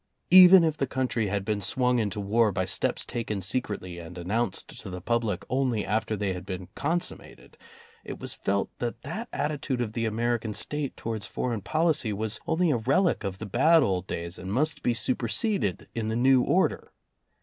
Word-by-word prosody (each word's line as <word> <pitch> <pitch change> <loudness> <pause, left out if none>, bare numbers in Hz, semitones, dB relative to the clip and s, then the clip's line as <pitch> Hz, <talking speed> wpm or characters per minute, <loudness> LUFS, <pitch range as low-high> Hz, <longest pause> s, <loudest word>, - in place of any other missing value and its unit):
Even 185 0 +10
if 160 -2 +1
the 135 - 0
country 125 -4 -1
had 100 0 -2
been 105 -1 -1
swung 125 +4 +1
into 105 -1 -2
war 105 +2 +2
by 95 -1 -1
steps 90 - -1
taken 110 -3 -3
secretly 95 -3 -2
and 85 +1 -10
announced 100 +4 -1
to - - -8
the 90 0 -6
public 110 -1 -1
only 125 -4 0
after 110 +2 -1
they 100 -2 -1
had 90 - -7
been 95 -1 -6
consummated, 170 +7 -3 0.5
it - - -7
was - - -3
felt 100 0 -1
that 120 -1 -4
that 230 +2 -5
attitude 145 -3 -2
of 115 -3 -2
the 115 -1 -1
American 115 -1 -1
State 150 -2 -3
towards 110 -2 -4
foreign 120 -4 -3
policy 155 - +1
was 110 +2 -2
only 165 0 +2
a 130 - +2
relic 135 - +1
of 95 -2 -4
the 110 - -6
bad 150 - +4
old 95 -4 -1
days 85 +1 -5
and 95 +1 -6
must 150 +7 +1
be 120 - +1
superseded 120 - -1
in 115 -2 -3
the 110 - -1
new 130 +2 +4
order. - - +1
115 Hz, 185 wpm, -27 LUFS, 100-130 Hz, 0.5 s, Even